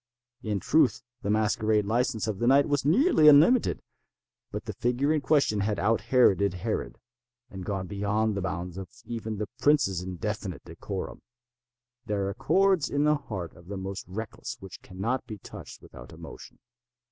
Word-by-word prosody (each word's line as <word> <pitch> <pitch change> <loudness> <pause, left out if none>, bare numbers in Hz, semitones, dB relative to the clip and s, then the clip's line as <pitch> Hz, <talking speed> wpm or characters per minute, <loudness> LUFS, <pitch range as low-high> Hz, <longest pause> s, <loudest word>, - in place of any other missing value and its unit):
In 105 -2 -2
truth 150 - +2 0.2
the 100 - -3
masquerade 110 0 +2
license 115 0 0
of 105 -3 -3
the 120 - +1
night 140 +2 +5
was 145 -2 0
nearly 170 - +4
unlimited; 160 - +5 0.7
but - - -5
the - - -5
figure 125 +5 0
in 155 - 0
question 140 -8 +2
had 105 +1 0
out 110 +3 +1
Heroded 100 -7 +3
Herod, 90 - -3 0.5
and 95 -1 -7
gone 95 -1 -3
beyond 105 +3 0
the 100 - -2
bounds 90 0 -4
of 95 - -8 0.2
even 110 -2 -5
the 105 - -2
prince's 130 - +3
indefinite 90 -2 -5
decorum. - - -6 0.9
There 100 -2 -1
are - - -3
chords 185 - +2
in 145 +1 +1
the 150 0 +4
hearts 95 - -5
of 85 - -17
the 100 0 -5
most 95 0 -6
reckless 105 +4 -6
which 95 -1 -11
cannot 115 +8 -3
be 110 -3 -7
touched - - -11
without - - -13
emotion. - - -11
110 Hz, 165 wpm, -27 LUFS, 95-135 Hz, 0.9 s, night